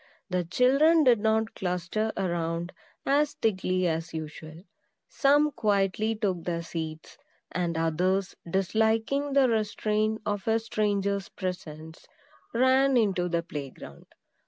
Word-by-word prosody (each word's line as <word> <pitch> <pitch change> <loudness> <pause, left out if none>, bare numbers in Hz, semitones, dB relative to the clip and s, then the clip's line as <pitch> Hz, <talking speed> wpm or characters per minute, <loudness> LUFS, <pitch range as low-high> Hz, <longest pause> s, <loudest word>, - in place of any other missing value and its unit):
The 180 -1 +1
children 275 - +4
did 245 -5 +5
not 220 +1 +1
cluster 180 +4 -2
around 170 -2 -2 0.3
as 290 +2 +2
thickly 185 -4 0
as 165 0 -3
usual. 155 +1 -8 0.4
Some 295 +1 +3
quietly 210 0 0
took 190 -6 -2
their 170 -1 -2
seats; 160 -1 -7 0.3
and 170 -2 -1
others, 180 +4 0
disliking 220 +9 +1
the 275 -2 +5
restraint 215 -1 0
of 205 0 -3
a 225 0 +3
stranger's 200 -3 -1
presence, 160 -4 -7 0.4
ran 260 +2 +3
into 190 -6 +1
the 170 -1 0
play 145 -5 -6
ground. 70 - -13
195 Hz, 120 wpm, -27 LUFS, 170-225 Hz, 0.4 s, did